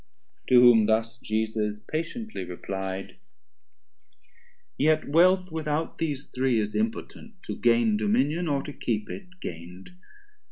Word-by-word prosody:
To 125 - +7
whom 120 -3 +7
thus 115 +1 0
Jesus 110 -1 -1
patiently 165 - -5
reply'd; 95 +2 -5 1.6
Yet 155 +2 +2
Wealth 180 +4 +4
without 160 0 -2
these 145 -4 -2
three 130 -2 0
is 105 0 -2
impotent, 225 0 -3
To - - -5
gain 115 -2 +3
dominion 130 +11 +1
or 140 -2 0
to 145 - -7
keep 110 -5 -3
it 185 -1 -10
gain'd. 90 - -8
125 Hz, 120 wpm, -26 LUFS, 105-160 Hz, 1.6 s, To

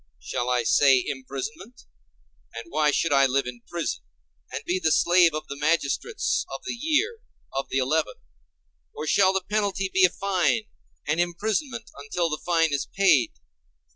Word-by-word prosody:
Shall 120 - -3
I 125 -1 +1
say 130 +1 +4
imprisonment? 140 - -6 0.7
And 115 -1 -8
why 150 0 +2
should 150 +1 +1
I 135 -1 +5
live 135 +1 0
in 125 -1 -7
prison, 170 -2 -3 0.5
and - - -5
be 180 +2 0
the 160 - +1
slave 175 0 +4
of 155 - -5
the 140 - -6
magistrates 165 - 0
of - - -7
the - - -3
year—of 315 - -3
the - - -1
Eleven? 150 +5 0 0.8
Or 155 - -5
shall 190 +4 +4
the 190 0 0
penalty 200 -2 -1
be 190 - +4
a 180 - +7
fine, 200 +4 0 0.4
and 150 +3 0
imprisonment 220 - -2
until 165 +4 -2
the 150 - -3
fine 165 -3 +2
is 140 - -1
paid? 150 - +3
165 Hz, 160 wpm, -25 LUFS, 140-195 Hz, 0.8 s, a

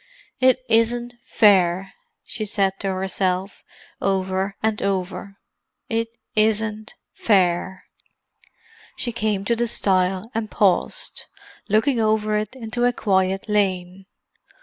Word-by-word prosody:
"It 255 0 +4
isn't 235 +1 +1
fair!" 190 -2 +3 0.3
she 215 - -5
said 200 -2 0
to 195 - -3
herself, 190 0 -2 0.4
over 190 0 -1
and 220 -1 0
over. 195 0 -3 0.5
"It 230 -1 0 0.3
isn't 215 +1 0 0.2
fair!" 185 -2 +1 1.1
She 240 - -2
came 215 -3 -1
to 235 - +2
the 240 +1 0
stile, 190 0 +1
and 225 -1 -3
paused, 205 - 0 0.4
looking 225 +5 +2
over 215 -1 +1
it 210 +3 -2
into 240 0 -2
a 245 - +2
quiet 190 -2 0
lane. 190 -2 -1
205 Hz, 110 wpm, -22 LUFS, 190-225 Hz, 1.1 s, It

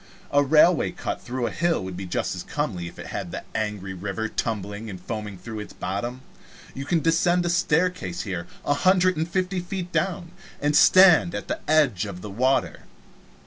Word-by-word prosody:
A 145 - +5
railway 155 +4 +4
"cut" - - -5
through 125 0 -3
a - - -2
hill 170 - 0
would 95 -1 -6
be 95 0 -6
as 90 - -2
comely 100 - -2
if - - -11
it - - -8
had - - -5
the - - -6
angry 105 -3 -3
river 100 +4 -3
tumbling 105 -1 -3
and 95 -3 -7
foaming 105 +1 -5
through 110 +3 -7
its 105 - -8
bottom. 120 +8 -4 0.5
You 135 - -6
can 165 +1 +1
descend 175 +2 +2
a - - +1
staircase 170 - 0
here 90 -4 -4 0.2
a 145 - +3
hundred 185 +3 +3
and 160 +2 -2
fifty 185 +1 -1
feet 180 0 -5
down, 175 -3 -1 0.3
and 145 +1 +1
stand 180 -1 +7
at - - -5
the - - -2
edge 140 - +3
of 90 -3 -7
the 105 - -6
water. 130 +6 0
130 Hz, 185 wpm, -25 LUFS, -, 0.5 s, stand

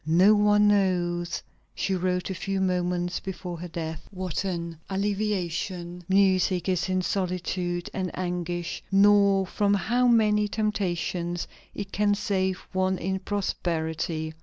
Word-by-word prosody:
"No 175 +7 +5
one 210 0 +4
knows," 175 -3 +1 0.3
she 195 - -1
wrote 180 0 -1
a - - -1
few 190 +1 -2
moments 180 -1 0
before 180 -3 -6
her 180 - -5
death, 160 -1 -5
"what 185 -3 -3
an 170 -4 -4
alleviation 190 -3 -2
music 190 -2 +3
is 185 0 0
in 185 0 +1
solitude 180 -2 -2
and 185 -2 -2
anguish, 175 -1 -3
nor 200 -1 +5
from 205 +2 +1
how 240 +5 +2
many 210 -3 +4
temptations 180 -5 -1 0.3
it 200 -1 -5
can 205 0 +2
save 190 -2 -1
one 185 0 +1
in 190 +2 -2
prosperity." 160 -5 -2
185 Hz, 130 wpm, -26 LUFS, 175-200 Hz, 0.3 s, No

